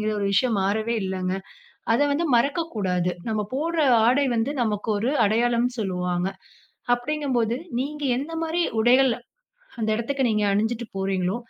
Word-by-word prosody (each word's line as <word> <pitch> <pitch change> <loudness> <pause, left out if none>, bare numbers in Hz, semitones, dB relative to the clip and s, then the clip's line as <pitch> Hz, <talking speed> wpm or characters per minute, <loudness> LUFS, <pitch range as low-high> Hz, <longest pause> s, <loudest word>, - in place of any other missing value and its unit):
அப்டீங்குற 215 0 0
ஒரு 200 - 0
விஷயம் 215 +2 +2
மாறவே 220 +4 0
இல்லங்க. 185 -1 -2 0.6
அத 235 - +2
வந்து 330 +4 0
மறக்கக்கூடாது. 215 - 0 0.2
நம்ப 215 -1 -1
போடுற 330 +4 -1 0.3
ஆடை 270 +4 +3
வந்து 230 +5 0
நமக்கு 210 -1 -2
ஒரு 230 +6 0
அடையாளம்னு 240 +3 +1
சொல்லுவாங்க. 180 -2 -1 0.7
அப்படிங்கும்போது 245 -4 -1 0.2
நீங்க 295 +2 -4
எந்த 290 +5 -5
மாதிரி 330 +2 0 0.2
உடைகள்? 250 +2 +5 0.7
அந்த 220 -1 0
இடத்துக்கு 265 +5 -1
நீங்க 215 -2 +1
அணிஞ்சுட்டு 225 +4 0
போறீங்களோ, 190 0 -1
230 Hz, 135 wpm, -24 LUFS, 200-270 Hz, 0.7 s, உடைகள்